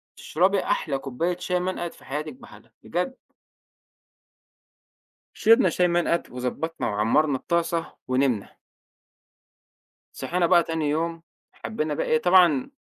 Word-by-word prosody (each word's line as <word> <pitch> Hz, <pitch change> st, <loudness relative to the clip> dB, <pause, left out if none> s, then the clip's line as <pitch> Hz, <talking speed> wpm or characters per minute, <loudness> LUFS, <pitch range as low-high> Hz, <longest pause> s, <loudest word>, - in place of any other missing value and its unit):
تشربي 190 Hz, +4 st, +1 dB
أحلى 140 Hz, -4 st, -1 dB
كوباية 150 Hz, +7 st, -2 dB
شاي 180 Hz, 0 st, -1 dB
منقد 180 Hz, -1 st, -3 dB
في -, -, -18 dB
حياتِك 150 Hz, -, -4 dB
بحالها 250 Hz, -1 st, -16 dB
بجد. 180 Hz, +10 st, -3 dB, 2.2 s
شربنا 225 Hz, -2 st, +5 dB
شاي 180 Hz, +1 st, +2 dB
منقد 170 Hz, 0 st, 0 dB
وضبّطنا 125 Hz, +3 st, -4 dB
وعمّرنا 115 Hz, +8 st, +2 dB
الطاسة 170 Hz, +3 st, -1 dB, 0.2 s
ونمنا. 130 Hz, -5 st, 0 dB, 1.6 s
صحينا 175 Hz, 0 st, -1 dB
بقى 170 Hz, 0 st, +5 dB
تاني 160 Hz, -2 st, -2 dB
يوم، 165 Hz, +2 st, -2 dB, 0.3 s
حبّينا 155 Hz, -8 st, -3 dB
بقى -, -, -2 dB
إيه 155 Hz, -, +3 dB
طبعًا 175 Hz, -, +4 dB
165 Hz, 110 wpm, -25 LUFS, 145-180 Hz, 2.2 s, شربنا